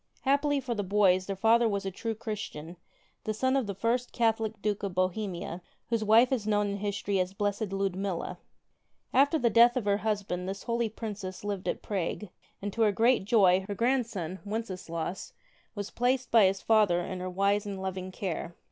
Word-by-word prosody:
Happily 285 +1 +2
for 255 -2 -3
the 210 - -2
boys, 185 -2 +3
their 195 - -2
father 225 +3 +4
was 200 -1 -2
a 195 - -2
true 225 +4 -4
Chris 215 -1 -4
tian, 160 +4 -9 0.5
the 215 - -2
son 260 +4 +1
of 265 -5 +1
the 200 - -4
first 235 +5 0
Catholic 225 -2 0
Duke 205 0 -1
of 195 -3 -4
Bohemia, 185 -1 -2 0.3
whose 230 -2 +1
wife 225 +4 +5
is 230 -5 -1
known 205 -1 +2
in 200 - -3
history 200 -1 -1
as 180 0 +1
the 195 - -19
Blessed 205 0 -1
Ludmilla. 195 -2 -2 0.7
After 280 +5 +4
the 240 -6 +2
death 235 +3 +6
of 240 - -2
her 200 -1 +2
husband 200 -4 -2
this 195 0 -5
holy 235 -1 0
princess 205 -4 -6
lived 200 -2 -3
at - - -2
Prague, 200 +1 -3 0.3
and, 205 -1 -3
to 230 - -2
her 215 -2 +5
great 230 +1 +3
joy, 190 -4 +4
her 205 - -3
grandson 225 -7 -1
Wenceslaus 185 -5 -4 0.4
was 205 -1 -5
placed 250 +1 0
by 225 -3 +7
his 190 +1 0
father 210 -6 +4
in 185 +1 -5
her 185 0 -4
wise 200 +3 +1
and 195 -1 -5
loving 185 0 -4
care. 175 -3 -4
205 Hz, 195 wpm, -29 LUFS, 190-230 Hz, 0.7 s, by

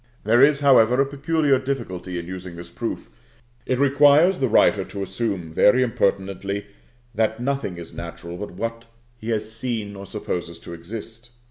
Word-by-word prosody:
There 120 +5 +5
is, 145 0 +4
however, 125 -3 +5
a 140 - +4
peculiar 140 0 +1
difficulty 110 -10 -4
in 85 - -5
using 90 -1 -7
this 85 0 -10
proof; 115 - -5 0.6
it 130 - +1
requires 145 +6 +5
the 130 - +2
writer 105 -3 +4
to 100 +1 -6
assume, 95 -4 -3
very 125 +9 +5
impertinently, 100 -3 -1 0.5
that 110 0 0
nothing 130 -8 -2
is 85 -1 -9
natural 85 0 -7
but 105 +3 -6
what 115 0 -4 0.3
he 110 - -6
has 110 -1 -2
seen 110 -3 -4
or 100 0 -9
supposes 90 -5 -4
to 85 - -9
exist. 115 +7 -8
110 Hz, 160 wpm, -23 LUFS, 95-130 Hz, 0.6 s, There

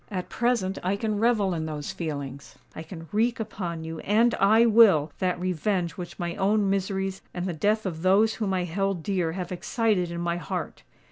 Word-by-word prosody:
At 185 -3 -4
present 230 -6 0
I 185 +3 0
can 210 0 -2
revel 215 -5 +2
in 160 -2 -3
those 150 +2 -4
feelings:—I 145 -4 -7
can 165 0 -9
wreak 230 +3 +1
upon 180 -7 -4
you—and 205 +9 +1
I 220 +4 +5
will—that 185 -6 +4
revenge 180 0 -1
which 175 -2 -8
my 175 -2 -3
own 205 +1 +2
miseries 195 0 -2
and 180 0 -2
the 180 - -2
death 210 +7 +1
of 165 -4 -4
those 200 +5 +4
whom 200 -3 0
I 185 -1 0
held 185 0 -2
dear 180 -4 -1
have 180 -1 -5
excited 185 0 0
in 170 0 -5
my 170 0 -1
heart! 175 -1 -5
185 Hz, 180 wpm, -26 LUFS, 170-210 Hz, -, I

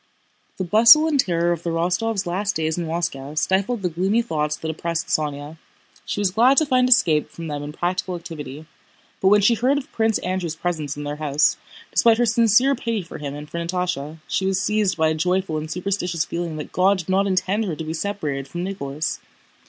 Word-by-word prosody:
The 190 - -2
bustle 230 - +7
and 300 -3 +1
terror 175 -5 +2
of 170 -2 -2
the 170 - -3
Rostóvs' 180 +5 0
last 195 +4 -1
days 160 0 -1
in 170 -2 -3
Moscow 155 -4 -3
stifled 195 +7 0
the 180 - +1
gloomy 190 +8 +1
thoughts 150 -7 -1
that 160 - -4
oppressed 170 +1 -3
Sónya. 150 +1 -2 0.5
She - - -2
was 200 -3 +1
glad 245 +7 +4
to 315 - +5
find 255 -2 +2
escape 170 -12 +4
from 165 - -9
them 145 -2 -4
in 145 0 -6
practical 180 +3 -2
activity. 155 -3 -8 0.6
But 190 - +3
when 205 +1 +6
she 205 +4 +5
heard 250 +5 +1
of 285 +2 -6
Prince 220 -1 +1
Andrew's 180 -3 -3
presence 160 -4 -3
in 145 - -5
their 145 0 -4
house, 150 -1 +2 0.4
despite 230 -1 +4
her 240 - +3
sincere 235 +3 +4
pity 230 -5 -2
for 170 - -10
him 145 -1 -5
and 150 +1 -8
for 170 - -5
Natásha, 170 -3 -3
she 190 - -1
was 190 -1 +1
seized 210 -4 +1
by 160 -1 +3
a - - +1
joyful 180 0 0
and 155 +1 -7
superstitious 180 -1 -2
feeling 170 -2 -4
that 150 - -7
God 190 +2 +3
did 180 -1 -7
not 195 +1 +2
intend 195 +3 0
her 175 -6 -3
to 160 - -6
be 155 0 -4
separated 160 -7 -3
from 175 +4 -5
Nicholas. 155 -6 -3
175 Hz, 210 wpm, -22 LUFS, 155-205 Hz, 0.6 s, bustle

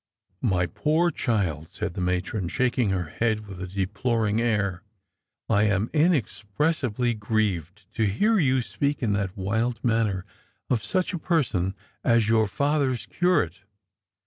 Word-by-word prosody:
" 95 0 -44 0.2
My 90 - +2
poor 160 - +1
child," 95 - -1
said - - -4
the 90 - -4
matron, 90 +2 -1
shaking 125 +1 +1
her 90 -4 -1
head 110 +2 -1
with 95 -2 -9
a 95 - -4
deploring 105 +4 0
air, 100 -6 0 0.3
" - - -57 0.3
I 105 -1 +3
am 105 +1 +1
inexpressibly 135 - +1
grieved 105 -4 -2
to 110 - +1
hear 210 - +2
you 130 -5 +2
speak 140 +2 -2
in 105 -3 +2
that 100 0 -2
wild 110 +5 -1
manner 110 -6 +1 0.5
of 115 -4 +1
such 185 - 0
a 175 - -2
person 120 - 0 0.3
as 115 -3 +3
your 110 -1 +3
father's 140 +2 0
curate. 135 - +1
110 Hz, 145 wpm, -26 LUFS, 95-130 Hz, 0.5 s, I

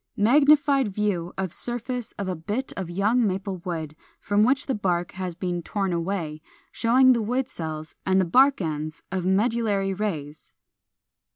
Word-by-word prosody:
Magnified 280 +3 +4
view 195 -4 -1
of 190 -3 -2
surface 245 0 -3
of 200 - -5
a 185 - -2
bit 210 +11 -3
of 190 -3 -4
young 215 +6 +2
Maple 190 0 -3
wood 165 -4 -5 0.2
from 205 +1 +2
which 265 +4 +2
the 270 - -1
bark 180 -5 -1
has 185 -2 -5
been 175 -1 -3
torn 195 +1 -2
away, 170 -3 -3 0.3
showing 255 +3 +5
the 235 - 0
wood 250 +4 -1
cells 155 -6 -6
and 190 0 +2
the 190 - +3
bark 260 +8 +4
ends 155 -1 -4
of 185 -1 -2
medullary 205 -1 +1
rays. 155 -7 -5
195 Hz, 160 wpm, -25 LUFS, 175-235 Hz, 0.3 s, showing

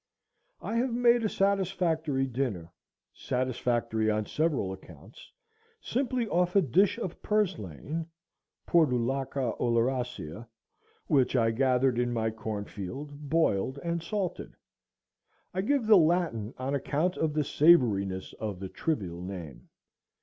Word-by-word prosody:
I 230 - -2
have 245 0 0
made 240 -1 +4
a 215 - +1
satisfactory 175 -8 +1
dinner, 115 -10 -3 0.4
satisfactory 120 -3 -1
on 110 0 0
several 145 - 0
accounts, 95 - -14 0.5
simply 250 - -1
off 180 -1 +1
a 200 - +7
dish 190 - +3
of 185 -7 -5
purslane 165 - -2 0.6
(Portulaca 135 -4 +1
oleracea) 120 - -1 0.6
which 135 -2 +2
I 115 -2 +3
gathered 125 0 +2
in 120 0 0
my 110 -1 0
cornfield, 110 +7 -6
boiled 135 -6 +1
and 170 0 -1
salted. 185 0 -4 1.0
I 185 - 0
give 270 +3 +1
the 215 -1 +7
Latin 155 - +1
on 130 +2 -3
account 150 +6 0
of 155 -2 0
the 150 - +2
savoriness 120 - +3
of 105 -4 -4
the 95 -1 -6
trivial 95 - -3
name. 90 -6 -8
135 Hz, 120 wpm, -29 LUFS, 110-175 Hz, 1.0 s, a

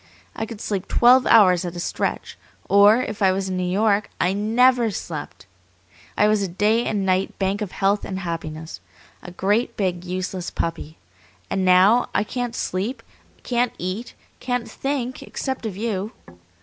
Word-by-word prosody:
I 220 - -3
could 225 -2 -9
sleep 200 -3 -3
twelve 250 +2 +5
hours 185 -5 +6
at 175 -1 -5
a - - -5
stretch, - - -3 0.3
or, 205 +5 +6
if 215 -2 -6
I 190 -1 +5
was 190 0 -2
in 185 - -2
New 180 0 -1
York, 205 +1 +1
I 180 - +2
NEVER 235 +3 +3
slept. 160 - -7 0.7
I 210 - +4
was 215 -1 +2
a 195 - -1
Day 210 +6 +1
and 205 -3 -1
Night 185 0 0
Bank 195 +2 -1
of 205 -4 -4
health 200 +1 +1
and 190 - -5
happiness, 160 - -6 0.4
a - - -9
great, 205 +6 0
big, 180 -3 -1
useless 185 0 -4
puppy. 165 -1 -4 0.5
And 190 - 0
now 185 +6 +5
I - - +3
can't 245 +2 -4
sleep, 200 +8 -3 0.4
can't 245 -1 0
eat, 185 +7 -5 0.2
can't 245 -2 -2
think 260 +1 -3
except 265 -4 -4
of 195 -3 -6
you. 210 -1 -3
200 Hz, 165 wpm, -22 LUFS, 185-230 Hz, 0.7 s, hours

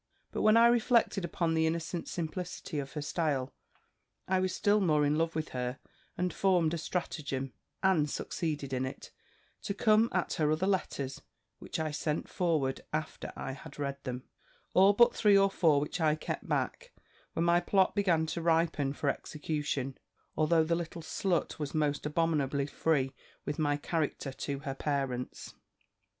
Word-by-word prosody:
"But - - -2
when 215 +1 +6
I 230 - +7
reflected 235 -4 +3
upon 170 -1 0
the 160 0 +3
innocent 165 +1 -3
simplicity 175 -1 -4
of 135 -1 -6
her 150 - -3
style, 145 -5 -1 0.7
I 190 0 +2
was 185 0 0
still 205 +2 +2
more 155 -5 +3
in 145 +1 +2
love 165 +1 0
with 155 -1 -2
her, 125 0 -3 0.4
and 180 0 0
formed 175 -5 +2
a 170 - -2
stratagem, 140 -6 -3 0.3
and 170 -6 +3
succeeded 145 -3 -3
in 130 0 0
it, 130 - -9 0.5
to 200 - -3
come 215 +2 +4
at 185 - 0
her 150 -1 +1
other 155 +4 +1
letters, 140 -8 -1 0.4
which - - -5
I 155 -1 -1
sent 150 +1 -2
forward, 155 -7 0
after 155 0 -4
I 135 - -4
had 135 - -10
read 140 -1 -4
them, 125 -1 -4 0.5
all 195 +2 +6
but 235 +3 +5
three 205 -2 +5
or 195 0 +4
four, 160 -7 +4
which 150 +4 -3
I 155 -1 +4
kept 155 - -5
back, - - -2 0.4
when 165 - 0
my 170 0 +5
plot 190 +2 +2
began 180 -6 +2
to 170 +2 -3
ripen 160 -4 +2
for 145 - -3
execution; 145 -2 -2 0.4
although 160 +1 +3
the 165 +1 0
little 170 -1 -3
slut 175 0 -1
was 150 0 -4
most 150 -1 0
abominably 150 -3 +1
free 145 -2 0 0.3
with 145 - -3
my 145 -2 +2
character 150 -2 -2
to 140 +1 -4
her 140 -3 -3
parents. 135 -3 -3
160 Hz, 165 wpm, -31 LUFS, 145-180 Hz, 0.7 s, I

